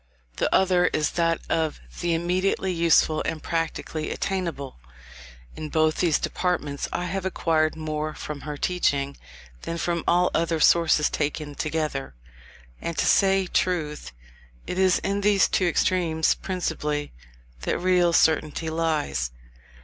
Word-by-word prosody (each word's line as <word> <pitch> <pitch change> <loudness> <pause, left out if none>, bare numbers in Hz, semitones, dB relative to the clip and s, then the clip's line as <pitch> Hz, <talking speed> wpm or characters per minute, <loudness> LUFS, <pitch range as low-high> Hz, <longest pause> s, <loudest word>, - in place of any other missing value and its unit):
The - - 0
other 180 -2 +4
is 150 - 0
that 165 -1 +1
of 160 -2 -1 0.2
the 170 -1 +1
immediately 185 +2 0
useful 165 -2 +3
and 155 - -4
practically 165 -1 -3
attainable. 170 - -3 0.8
In 155 -1 -6
both 155 0 +2
these 165 -4 +3
departments, 150 -6 -2
I 175 - -2
have 190 +2 -3
acquired 160 -4 +1
more 155 -1 -3
from 150 -2 -6
her 150 0 -6
teaching, 140 -5 0 0.5
than 165 - -4
from 170 -1 -1
all 180 +1 +3
other 165 -1 0
sources 155 -2 +4
taken 145 0 -2
together. 150 - -3 0.7
And, 170 - -4
to - - +1
say 195 -1 +4
truth, 160 - -1 0.5
it 180 - -3
is 185 -2 +4
in 200 +1 -1
these 200 -1 +4
two 185 - +1
extremes 165 -2 +2
principally, 150 -5 -3 0.5
that - - -1
real 180 -1 +3
certainty 160 0 +2
lies. 155 - -1
165 Hz, 135 wpm, -25 LUFS, 155-180 Hz, 0.8 s, other